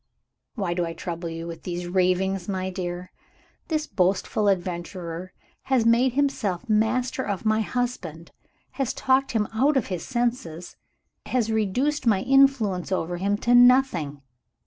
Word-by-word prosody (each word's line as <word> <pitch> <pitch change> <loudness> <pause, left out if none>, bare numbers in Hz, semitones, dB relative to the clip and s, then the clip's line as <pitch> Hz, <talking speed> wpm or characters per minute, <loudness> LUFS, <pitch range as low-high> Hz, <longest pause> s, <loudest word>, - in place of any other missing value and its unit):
"Why 195 -7 -1
do 175 0 -1
I 165 -1 -3
trouble 170 0 -5
you 165 0 -6
with 170 -1 -7
these 175 0 -4
ravings? 185 +1 0
My 190 -1 -2
dear, 180 -1 -5 0.6
this 310 -1 -1
boastful 195 +1 0
adventurer 175 -1 -3 0.3
has 260 -4 +2
made 235 +2 +4
himself 255 -10 -1
master 225 +4 +1
of 200 -4 -4
my 215 0 +3
husband, 210 -9 -4 0.4
has 265 -2 -2
talked 265 0 +1
him 215 -3 +1
out 270 +6 +3
of 245 - -1
his 175 - -4
senses, 235 -9 -3 0.5
has 230 -3 0
reduced 240 +7 0
my 200 -4 +3
influence 255 -9 +3
over 175 -1 -1
him 200 +3 0
to 240 - +4
nothing. 245 - +4
200 Hz, 145 wpm, -25 LUFS, 175-245 Hz, 0.6 s, made